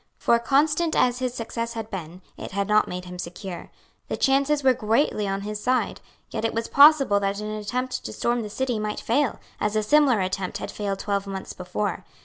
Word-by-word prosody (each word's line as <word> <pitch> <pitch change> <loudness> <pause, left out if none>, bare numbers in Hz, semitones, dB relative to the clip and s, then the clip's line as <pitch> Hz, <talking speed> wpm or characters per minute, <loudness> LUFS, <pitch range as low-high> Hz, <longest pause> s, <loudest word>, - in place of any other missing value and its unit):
For, 235 - +3
constant 305 +6 +2
as 245 0 +2
his 255 -1 -2
success 230 0 -4
had 225 -1 -6
been, 180 -1 -7
it - - -8
had 200 0 -1
not 210 0 +4
made 180 0 -5
him 180 0 -9
secure. 180 +1 -7 0.4
The - - -3
chances 280 +2 +2
were 260 -1 +6
greatly 225 -2 +1
on 195 0 -2
his 210 +1 -5
side. 255 +2 0 0.3
Yet - - -3
it 225 - -1
was 230 0 -1
possible 280 -7 +6
that 200 0 -1
an 210 0 -4
attempt 240 +5 -3
to 110 - -4
storm 240 - 0
the 210 - -5
city 245 +1 -1
might 210 0 -3
fail, 265 +2 0 0.2
as 210 0 -1
a 215 - +2
similar 275 -1 +4
attempt 185 0 -2
had - - -6
failed 200 -2 -3
twelve 200 0 -2
months 195 -1 -6
before. 185 +3 -3
215 Hz, 205 wpm, -25 LUFS, 200-255 Hz, 0.4 s, were